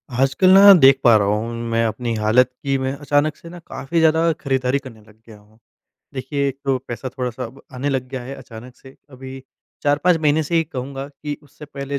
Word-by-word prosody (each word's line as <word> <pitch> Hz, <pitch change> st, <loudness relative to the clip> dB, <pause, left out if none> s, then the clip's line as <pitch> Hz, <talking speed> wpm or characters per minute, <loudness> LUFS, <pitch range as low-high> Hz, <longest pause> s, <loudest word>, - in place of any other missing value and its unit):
आजकल 135 Hz, +8 st, +2 dB
न 200 Hz, -1 st, +9 dB
देख 135 Hz, -1 st, +6 dB
पा 120 Hz, -3 st, +6 dB
रहा 100 Hz, -1 st, 0 dB
हूँ, 105 Hz, +3 st, -1 dB, 0.2 s
मैं 115 Hz, 0 st, +1 dB
अपनी 115 Hz, +2 st, -3 dB
हालत 110 Hz, +4 st, +3 dB
की 135 Hz, -1 st, 0 dB
मैं 130 Hz, 0 st, -2 dB
अचानक 145 Hz, +1 st, 0 dB
से 170 Hz, -, -13 dB
न 175 Hz, +1 st, -11 dB
काफ़ी 135 Hz, +5 st, -3 dB
ज़्यादा 160 Hz, +1 st, +3 dB
खरीदारी 135 Hz, -1 st, 0 dB
करने 125 Hz, -6 st, -13 dB
लग 105 Hz, 0 st, -21 dB
गया 110 Hz, -2 st, -13 dB
हूँ। 105 Hz, +1 st, -24 dB, 0.6 s
देखिए 140 Hz, +2 st, -2 dB
एक 135 Hz, 0 st, -7 dB
तो 135 Hz, -1 st, +1 dB
पैसा 120 Hz, +2 st, -5 dB
थोड़ा 125 Hz, -1 st, -4 dB
सा 125 Hz, +2 st, -7 dB
अब 125 Hz, +3 st, -11 dB
आने 135 Hz, +3 st, -3 dB
लग 130 Hz, -2 st, -2 dB
गया 130 Hz, -1 st, -6 dB
है 130 Hz, +3 st, -8 dB
अचानक 120 Hz, -1 st, -12 dB
से। 135 Hz, 0 st, -16 dB, 0.2 s
अभी 130 Hz, 0 st, -10 dB, 0.4 s
4-5 150 Hz, +5 st, +2 dB
महीने 155 Hz, 0 st, +2 dB
से 155 Hz, +3 st, -4 dB
ही 165 Hz, -1 st, +3 dB
कहूँगा 135 Hz, -1 st, -6 dB
कि 145 Hz, 0 st, -7 dB
उससे 145 Hz, +1 st, -14 dB
पहले 140 Hz, -1 st, -6 dB
135 Hz, 215 wpm, -20 LUFS, 125-145 Hz, 0.6 s, न